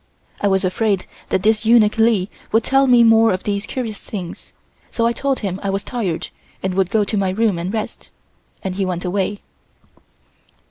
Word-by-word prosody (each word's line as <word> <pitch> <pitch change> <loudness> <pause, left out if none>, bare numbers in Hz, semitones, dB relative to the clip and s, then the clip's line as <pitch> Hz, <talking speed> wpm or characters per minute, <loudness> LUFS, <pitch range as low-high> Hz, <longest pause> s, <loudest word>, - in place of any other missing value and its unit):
I 205 - +2
was 190 -1 +2
afraid 195 0 0 0.2
that 185 - 0
this 215 0 +2
eunuch 220 -2 +5
Li 220 -5 +3 0.2
would 225 +1 +3
tell 270 +2 +3
me 245 -2 +6
more 225 0 +5
of 185 0 -2
these 200 0 -2
curious 230 -5 -4
things, 185 -5 -8 0.4
so 230 - 0
I 235 - +3
told 275 +2 -1
him 195 -3 -3
I 200 - -2
was 195 0 -1
tired 205 -10 -3 0.3
and 190 -1 -1
would 190 -1 +1
go 215 +1 +2
to 205 +1 -2
my 195 -1 +1
room 200 -2 +1
and 175 +3 -3
rest, 220 -1 -5 0.5
and 190 - -2
he 195 +1 -1
went 180 -1 -3
away. 200 +2 -1
205 Hz, 190 wpm, -20 LUFS, 190-225 Hz, 0.5 s, me